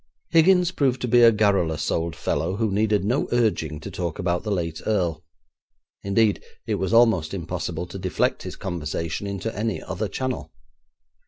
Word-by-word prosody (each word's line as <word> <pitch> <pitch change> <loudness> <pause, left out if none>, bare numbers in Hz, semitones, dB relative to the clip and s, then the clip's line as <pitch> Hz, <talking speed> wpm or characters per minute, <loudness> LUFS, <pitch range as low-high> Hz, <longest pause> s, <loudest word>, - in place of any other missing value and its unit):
Higgins 180 +2 +5
proved 135 -7 +1
to 125 - -1
be 120 +1 +5
a 115 -1 +8
garrulous 95 -8 +1
old 85 0 -1
fellow, 90 +4 -1
who 110 -1 0
needed 105 -1 +1
no 125 +7 +1
urging 105 -11 0
to - - -7
talk 85 -3 -3
about 90 -2 0
the 110 - -5
late 85 -5 -2
earl; 90 -7 0 0.8
indeed, 105 +1 +2 0.2
it - - -1
was 95 +1 -1
almost 110 -8 +4
impossible 90 -1 -4
to 95 +2 -8
deflect 95 0 0
his - - -7
conversation 85 +1 -4
into 100 +3 -4
any 110 +1 -1
other 105 +3 -4
channel. 130 +4 -4
100 Hz, 165 wpm, -24 LUFS, 85-115 Hz, 0.8 s, a